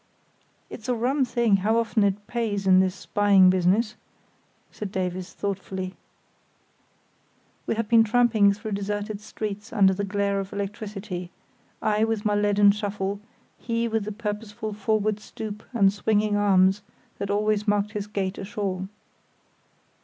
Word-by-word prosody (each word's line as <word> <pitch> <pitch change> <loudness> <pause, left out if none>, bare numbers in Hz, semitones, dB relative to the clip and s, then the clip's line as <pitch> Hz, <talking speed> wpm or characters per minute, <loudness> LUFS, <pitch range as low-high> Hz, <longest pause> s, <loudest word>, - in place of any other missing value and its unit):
"It's 225 +2 -9
a 250 - +2
rum 260 +4 +1
thing 235 -5 +2
how 215 +4 +1
often 230 -2 +1
it 200 +1 0
pays 215 -5 -2
in 185 -1 +6
this 185 0 +1
spying 195 -1 +4
business," 190 +5 +2 0.8
said 210 -3 -6
Davies 185 -1 -3
thoughtfully. 190 -2 -4 1.7
We - - 0
had 225 -1 -2
been 230 0 +6
tramping 225 -3 +4
through 215 +2 -5
deserted 205 +1 -3
streets 210 +1 -6
under 195 -4 +4
the 200 +2 -3
glare 200 0 0
of 195 0 -5
electricity, 200 -3 -5 0.5
I 215 0 +2
with 225 -2 -2
my 210 - +2
leaden 205 0 +4
shuffle, 200 -1 -3 0.4
he 230 0 -1
with 225 -2 -1
the 215 - -4
purposeful 210 0 -5
forward 215 0 0
stoop 210 0 -7
and 200 -5 +3
swinging 210 0 +1
arms 195 -1 +4 0.4
that 200 - -3
always 210 +1 +1
marked 205 0 +1
his 210 -1 -4
gait 195 -2 -3
ashore. 195 -2 -3
205 Hz, 140 wpm, -25 LUFS, 195-215 Hz, 1.7 s, in